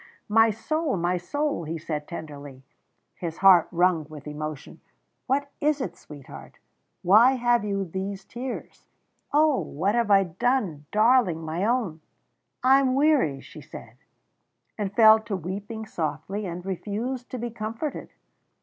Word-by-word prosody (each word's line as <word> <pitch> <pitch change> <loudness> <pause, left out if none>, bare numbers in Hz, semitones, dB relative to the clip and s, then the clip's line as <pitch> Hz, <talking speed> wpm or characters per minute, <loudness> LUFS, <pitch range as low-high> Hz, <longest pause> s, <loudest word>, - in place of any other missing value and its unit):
"My 225 +1 +5
soul, 305 - -1
my 175 +1 0
soul!" 285 - -2
he 165 +2 -4
said 150 -2 -5
tenderly, 145 -5 -9 0.5
his 165 -2 -6
heart 185 -3 +6
wrung 175 -3 +2
with 150 -2 -10
emotion. 150 -1 -7 0.5
"What 280 +2 0
is 300 0 +2
it, 185 -10 -4
sweetheart 145 -3 -12 0.5
why 220 +8 +6
have 240 -3 +2
you 200 -2 -2
these 190 +2 -5
tears? 245 +1 -7 0.4
Oh! 300 -1 +4
what 190 +8 -1
have 235 -2 +1
I 195 -1 +6
done 185 - -1
darling, 215 -7 +3
my 160 +5 -2
own?" 220 -10 -1 0.6
"I 265 +2 +6
am 260 -2 +1
weary," 270 - +2
she - - -12
said, - - -12 0.8
and 205 -2 -3
fell 220 +1 +7
to 220 -2 -4
weeping 200 +5 -6
softly, 165 +4 -4
and 175 +1 -6
refused 220 +7 -4
to 255 - -5
be 240 0 -4
comforted. 225 +7 -5
200 Hz, 140 wpm, -25 LUFS, 165-245 Hz, 0.8 s, fell